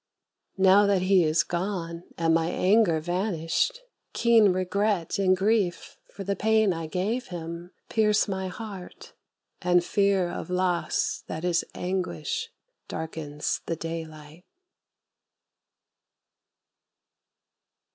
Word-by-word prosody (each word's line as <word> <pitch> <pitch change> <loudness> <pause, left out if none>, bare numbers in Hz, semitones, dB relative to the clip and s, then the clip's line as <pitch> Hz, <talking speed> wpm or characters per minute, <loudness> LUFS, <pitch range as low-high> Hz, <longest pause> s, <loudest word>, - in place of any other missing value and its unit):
Now 195 +2 +6
that 195 -2 +2
he 185 -1 +4
is 155 0 +2
gone 170 -2 -4
and 165 -1 +2
my 165 0 +2
anger 185 -2 +3
vanished, 180 - -1 0.3
Keen 225 -4 +5
regret 185 0 0
and 185 -1 +3
grief 195 -2 0 0.2
for 200 - -7
the 200 +1 -1
pain 220 -2 +3
I 165 -1 -5
gave 205 +9 -2
him 170 0 -7 0.2
Pierce 215 -1 +2
my 190 -1 -3
heart, 195 -1 -9 0.5
and 175 -1 +3
fear 195 -2 +2
of 175 - -6
loss 180 -1 0
that 160 +2 -5
is 175 -1 +2
anguish 190 - -3 0.4
Darkens 155 -2 -4
the 165 - -1
daylight. 160 0 -7
185 Hz, 105 wpm, -26 LUFS, 170-200 Hz, 0.5 s, Now